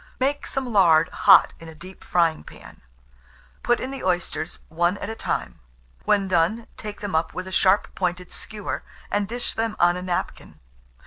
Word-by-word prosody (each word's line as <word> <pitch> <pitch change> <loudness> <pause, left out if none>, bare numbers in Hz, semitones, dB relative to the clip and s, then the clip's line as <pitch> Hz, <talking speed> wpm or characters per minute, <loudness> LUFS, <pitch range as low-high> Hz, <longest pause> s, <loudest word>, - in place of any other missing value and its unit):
Make 280 +2 0
some 260 -3 -3
lard 165 -4 +5
hot - - +6
in 165 - -11
a 160 - -12
deep 185 +4 -12
frying 165 -3 +1
pan, - - -14 0.8
put 240 0 +2
in 260 - -4
the 275 - -7
oysters, 175 -2 -2
one 175 +4 0
at 205 - -5
a - - -6
time; - - -3 0.5
when 200 -2 +2
done, 185 +6 +1
take 210 -2 -8
them 205 -2 -4
up 160 +1 0
with 185 - -4
a 190 - -8
sharp 190 +1 +2
pointed 180 -1 -3
skewer, 210 -1 -5 0.3
and 205 -1 0
dish 240 +2 -4
them 225 -1 -2
on 175 0 +4
a 180 - -5
napkin. 180 -1 -4
185 Hz, 180 wpm, -24 LUFS, 175-220 Hz, 0.8 s, hot